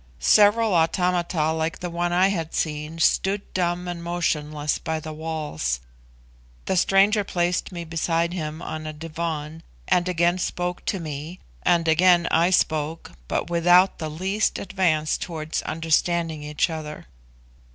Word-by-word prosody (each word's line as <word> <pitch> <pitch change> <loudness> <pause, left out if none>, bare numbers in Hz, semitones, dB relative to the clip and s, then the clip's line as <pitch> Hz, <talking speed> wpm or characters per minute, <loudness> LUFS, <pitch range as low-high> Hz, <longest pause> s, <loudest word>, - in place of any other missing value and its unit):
Several 210 - +4
automata, 170 -1 +1
like 160 +3 -2
the 180 - -5
one 175 +1 -1
I 185 +2 +4
had 165 -5 -3
seen, 150 0 -2
stood 195 +4 +2
dumb 180 0 -1
and 175 -1 -5
motionless 150 -3 -1
by 160 -1 -3
the 155 0 -7
walls. 150 - -3 0.9
The 190 - 0
stranger 195 +3 +4
placed 175 -1 -1
me 175 -2 -5
beside 165 +1 0
him 160 -1 -5
on 155 0 -5
a 155 - -5
divan 160 0 -5 0.3
and 180 0 +2
again 175 +1 +2
spoke 180 0 -3
to 195 - -1
me, 155 +2 -6 0.2
and 170 -2 +2
again 175 +1 +4
I 170 +2 +4
spoke, 160 -3 0 0.2
but 175 - -2
without 175 +2 +4
the 155 -2 -3
least 190 +7 -1
advance 160 -6 0
towards 160 -2 -4
understanding 165 0 0
each 150 +3 -1
other. 155 -1 -7
170 Hz, 140 wpm, -24 LUFS, 155-180 Hz, 0.9 s, Several